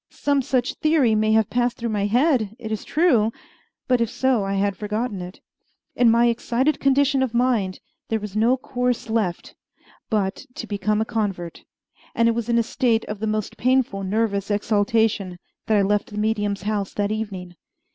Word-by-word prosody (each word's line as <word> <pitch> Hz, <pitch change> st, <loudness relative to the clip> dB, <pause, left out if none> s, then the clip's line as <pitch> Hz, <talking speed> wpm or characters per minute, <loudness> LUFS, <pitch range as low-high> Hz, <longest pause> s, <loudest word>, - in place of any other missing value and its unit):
Some 285 Hz, -1 st, 0 dB
such 255 Hz, -1 st, 0 dB
theory 305 Hz, -7 st, +3 dB
may 215 Hz, 0 st, +2 dB
have 220 Hz, -2 st, +2 dB
passed 245 Hz, 0 st, 0 dB
through 235 Hz, -1 st, -3 dB
my 205 Hz, -2 st, 0 dB
head, 240 Hz, -2 st, +2 dB
it 220 Hz, -3 st, -7 dB
is 215 Hz, -, -3 dB
true; 255 Hz, -10 st, +2 dB, 0.6 s
but 250 Hz, -2 st, +2 dB
if 230 Hz, -, +1 dB
so, 260 Hz, -4 st, +1 dB
I 195 Hz, 0 st, -2 dB
had 200 Hz, 0 st, 0 dB
forgotten 210 Hz, 0 st, -3 dB
it. 180 Hz, +1 st, -9 dB, 0.6 s
In 245 Hz, -2 st, +4 dB
my 235 Hz, +1 st, +4 dB
excited 240 Hz, +4 st, +1 dB
condition 275 Hz, 0 st, +3 dB
of 250 Hz, -3 st, -1 dB
mind 235 Hz, -7 st, +1 dB, 0.3 s
there 225 Hz, -, 0 dB
was 210 Hz, -1 st, -7 dB
no 235 Hz, +4 st, +3 dB
course 250 Hz, -2 st, -2 dB
left 205 Hz, -6 st, -1 dB, 0.6 s
but 200 Hz, -3 st, -1 dB
to -, -, -5 dB
become 210 Hz, 0 st, -1 dB
a -, -, 0 dB
convert, 195 Hz, -7 st, -3 dB, 0.5 s
and 230 Hz, 0 st, +3 dB
it -, -, +4 dB
was 235 Hz, 0 st, -3 dB
in 235 Hz, -, +3 dB
a 235 Hz, -, +3 dB
state 230 Hz, -1 st, 0 dB
of 210 Hz, -1 st, -6 dB
the 220 Hz, -, -2 dB
most 215 Hz, -1 st, -2 dB
painful 255 Hz, -5 st, +1 dB
nervous 200 Hz, 0 st, -1 dB
exaltation 205 Hz, -2 st, +1 dB, 0.3 s
that 220 Hz, -, +3 dB
I 200 Hz, -, +3 dB
left 205 Hz, +1 st, 0 dB
the 210 Hz, -, -8 dB
medium's 205 Hz, -2 st, -1 dB
house 205 Hz, -2 st, -2 dB
that 205 Hz, 0 st, 0 dB
evening. 195 Hz, -5 st, -5 dB
220 Hz, 185 wpm, -23 LUFS, 205-245 Hz, 0.6 s, In